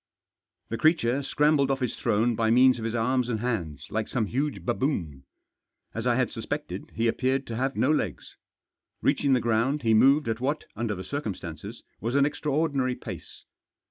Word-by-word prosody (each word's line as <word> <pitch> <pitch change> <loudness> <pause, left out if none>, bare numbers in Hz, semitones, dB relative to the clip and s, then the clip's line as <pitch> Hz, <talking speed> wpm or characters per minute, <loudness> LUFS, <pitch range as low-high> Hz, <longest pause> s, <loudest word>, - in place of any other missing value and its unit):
The 115 - -3
creature 140 -5 +3
scrambled 145 0 +2
off 135 -1 0
his 125 -3 -2
throne 115 +3 +1
by 110 0 +1
means 125 +2 +5
of 110 - -4
his 115 +1 -2
arms 125 +2 +1
and 110 -3 -1
hands, 85 - -3
like 110 -1 -1
some 120 -4 0
huge 140 +7 -2
baboon. 95 - -2 0.7
As - - -3
I - - +3
had - - +1
suspected, - - -5
he 115 +1 +1
appeared 130 +3 0
to 115 - -5
have 135 +3 -1
no 135 - +2
legs. 105 - -2 0.7
Reaching 140 -2 +2
the 130 - +4
ground 120 +5 +1
he 110 -1 +3
moved 135 +6 +5
at 115 0 -1
what, 145 +4 -1
under 110 -1 -2
the 95 - -6
circum 140 -7 -3
stances, 80 -2 -8 0.2
was 115 +6 -2
an 140 0 +5
extraordinary 145 -3 0
pace. - - -9
125 Hz, 180 wpm, -27 LUFS, 110-140 Hz, 0.7 s, means